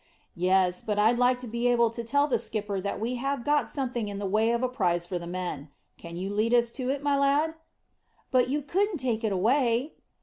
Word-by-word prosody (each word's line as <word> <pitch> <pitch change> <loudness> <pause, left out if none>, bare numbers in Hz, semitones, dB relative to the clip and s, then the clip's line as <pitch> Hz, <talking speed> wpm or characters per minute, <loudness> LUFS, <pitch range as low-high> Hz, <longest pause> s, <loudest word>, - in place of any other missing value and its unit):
"Yes; 180 0 +2
but 210 -1 -2
I'd 225 +3 +3
like 250 0 +4
to 250 - -6
be 235 +2 -1
able 235 -2 +3
to 235 0 -5
tell 285 +5 +2
the 295 - 0
skipper 205 -3 -3
that 200 +1 -3
we 240 +3 -2
have 275 0 -2
got 295 0 +2
something 245 -6 -3
in 200 - -5
the 200 - -4
way 215 +4 +2
of 235 +1 0
a - - +3
prize 175 -8 0
for 175 0 -3
the 170 - -8
men. 175 -5 -5 0.3
Can 170 0 -8
you 195 +3 -4
lead 225 +3 +2
us 235 -1 +2
to 255 0 -4
it, 275 +1 -2
my 285 -1 +2
lad?" 285 +3 +2 0.8
"But 255 -1 +3
you 290 +2 -1
couldn't 385 +6 0
take 240 -4 -2
it 220 - 0
away." 240 +7 +1
235 Hz, 230 wpm, -27 LUFS, 200-265 Hz, 0.8 s, like